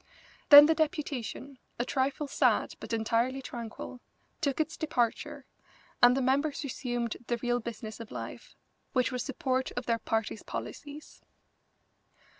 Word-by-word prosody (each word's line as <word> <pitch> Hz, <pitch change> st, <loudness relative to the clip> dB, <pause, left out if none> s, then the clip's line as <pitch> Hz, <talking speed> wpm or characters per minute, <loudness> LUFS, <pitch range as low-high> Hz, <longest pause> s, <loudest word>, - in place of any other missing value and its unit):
Then 290 Hz, 0 st, +12 dB
the 320 Hz, -, +4 dB
deputation, 285 Hz, -4 st, -3 dB, 0.2 s
a 240 Hz, -, -1 dB
trifle 270 Hz, +3 st, -1 dB
sad -, -, +2 dB
but -, -, -8 dB
entirely 230 Hz, +3 st, +1 dB
tranquil, 240 Hz, 0 st, -7 dB, 0.4 s
took 280 Hz, -3 st, 0 dB
its 315 Hz, +1 st, 0 dB
departure, 245 Hz, -7 st, -1 dB, 0.6 s
and 245 Hz, +1 st, +7 dB
the 270 Hz, -, +1 dB
members 280 Hz, +4 st, +1 dB
resumed 240 Hz, -4 st, -3 dB
the 240 Hz, -, 0 dB
real 245 Hz, +1 st, 0 dB
business 220 Hz, -2 st, -7 dB
of 230 Hz, -1 st, -8 dB
life, -, -, -8 dB, 0.4 s
which 255 Hz, 0 st, +2 dB
was 250 Hz, -1 st, -2 dB
support 260 Hz, 0 st, -1 dB
of 245 Hz, 0 st, -4 dB
their 230 Hz, -1 st, +1 dB
party's 225 Hz, -1 st, -2 dB
policies. 295 Hz, 0 st, -8 dB
255 Hz, 135 wpm, -30 LUFS, 235-285 Hz, 0.6 s, Then